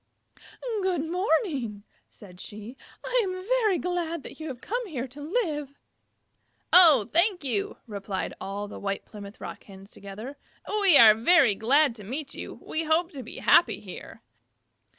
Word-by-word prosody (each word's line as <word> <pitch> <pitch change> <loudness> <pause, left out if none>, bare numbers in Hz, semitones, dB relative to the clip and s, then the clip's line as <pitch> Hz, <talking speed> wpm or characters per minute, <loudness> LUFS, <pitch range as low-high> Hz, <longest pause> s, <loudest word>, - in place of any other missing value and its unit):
"Good 360 -5 -1
morning," 320 - -1 0.3
said 180 -4 -15
she. 215 +6 -9 0.3
"I - - +2
am 375 -2 -3
very 450 -5 +2
glad 335 -3 -3
that - - -11
you 315 - -6
have 260 -5 -7
come 480 - -4
here 265 -7 -5
to 275 +4 -12
live." 295 - -3 1.0
"Oh, 315 - +8
thank 355 +1 +3
you," 230 -7 -2
replied 200 -3 -5
all 200 +1 -5
the - - -9
White 195 0 -4
Plymouth 205 -1 -11
Rocks 195 0 -11
together. 215 +8 -9 0.4
"We 375 -7 +7
are 220 -2 +9
very 240 - +4
glad 270 +6 +2
to 210 - -11
meet 275 +8 -6
you. - - -7
We 320 +1 -3
hope 330 +3 +1
to 275 - -8
be - - -9
happy - - +4
here." - - -11
285 Hz, 150 wpm, -26 LUFS, 210-350 Hz, 1.0 s, are